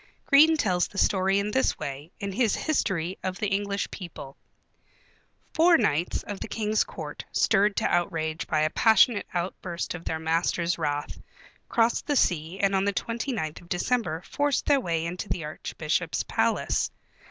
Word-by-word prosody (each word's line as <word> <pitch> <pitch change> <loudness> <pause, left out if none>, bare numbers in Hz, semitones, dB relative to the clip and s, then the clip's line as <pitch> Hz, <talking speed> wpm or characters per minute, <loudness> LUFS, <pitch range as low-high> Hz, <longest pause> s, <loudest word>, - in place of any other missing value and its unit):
Green 315 +3 +6
tells 180 - +1
the 200 - -13
story 195 0 +2
in 200 +1 -1
this 265 - +1
way, 145 +1 -6
in 200 -1 -3
his 220 +1 +1
History 190 - -1
of 185 -1 -3
the 210 - -1
English 200 0 -1
People: 170 -7 -8 1.2
"Four 335 +1 +6
knights 170 - 0
of 205 -2 -6
the - - -5
King's 215 -1 0
court, - - -8
stirred 205 -1 +3
to - - 0
outrage 160 -2 -1
by 155 - +1
a 155 0 +1
passionate 220 0 +4
outburst 175 -1 -3
of 175 -1 -8
their 160 - -1
master's 165 +1 0
wrath, 145 -2 -3 0.5
crossed 230 0 +1
the 290 - +1
sea 175 - +1
and 195 -1 +2
on 195 0 +2
the 200 - +1
twenty 230 +7 -3
ninth 155 -10 -4
of 175 - -18
December 180 -3 -1
forced 290 -1 0
their 285 -2 +4
way 165 -8 -1
into 175 +2 -5
the 170 - -2
Archbishop's 150 - -2
palace. - - 0
190 Hz, 165 wpm, -26 LUFS, 165-220 Hz, 1.2 s, Green